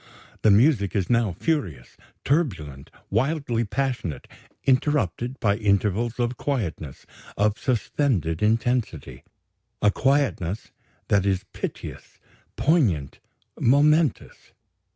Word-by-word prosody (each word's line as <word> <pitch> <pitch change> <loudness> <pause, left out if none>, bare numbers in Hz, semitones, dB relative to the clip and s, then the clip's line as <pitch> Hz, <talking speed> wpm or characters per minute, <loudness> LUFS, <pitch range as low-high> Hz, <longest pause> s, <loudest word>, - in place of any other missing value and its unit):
The 110 - +4
music 105 - +4
is 100 +2 0
now 115 -5 +2
furious, 95 - -2 0.3
turbulent, 90 - -1 0.2
wildly 125 +1 0
passionate, 120 - -3 0.4
interrupted 130 - 0
by 100 -1 +1
intervals 105 +3 0
of 120 0 -1
quietness, 90 - -4 0.3
of 105 +1 +1
suspended 115 - 0
intensity 115 - -1 0.6
a 105 - +3
quietness 130 - 0 0.4
that 100 -2 +3
is 95 -2 0
piteous, - - -7 0.4
poignant, 115 - +1 0.4
momentous. 150 +2 +2
115 Hz, 90 wpm, -24 LUFS, 95-135 Hz, 0.6 s, The